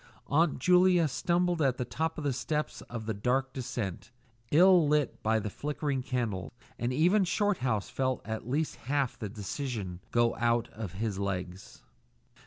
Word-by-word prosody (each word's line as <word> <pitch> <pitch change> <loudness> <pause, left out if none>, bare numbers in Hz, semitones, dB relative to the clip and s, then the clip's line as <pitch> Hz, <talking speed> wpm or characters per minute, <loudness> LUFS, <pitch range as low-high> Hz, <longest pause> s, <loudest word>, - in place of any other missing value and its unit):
Aunt 155 +2 +2
Julia 180 +2 +5
stumbled 175 +4 +1
at 130 -3 +2
the 125 - -2
top 160 +5 -2
step 150 +4 -2 0.2
of 115 -2 -5
the 110 - -1
dark 130 +6 0
descent, 115 -7 -4 0.4
ill 175 0 +6
lit 150 -2 +1
by 110 +1 +2
the 105 -1 -3
flickering 145 0 -2
candle, 120 -7 -2 0.3
and 120 +1 0
even 175 +9 +4
Shorthouse 170 - 0
felt 130 -1 -2
at 110 +1 -5
least 150 +4 -1
half 140 -2 0
the 105 - -4
decision 105 -3 -4
go 120 -1 +2
out 120 0 +1
of 105 -5 -7
his 100 0 -2
legs. 95 -1 -5
130 Hz, 150 wpm, -30 LUFS, 110-155 Hz, 0.4 s, ill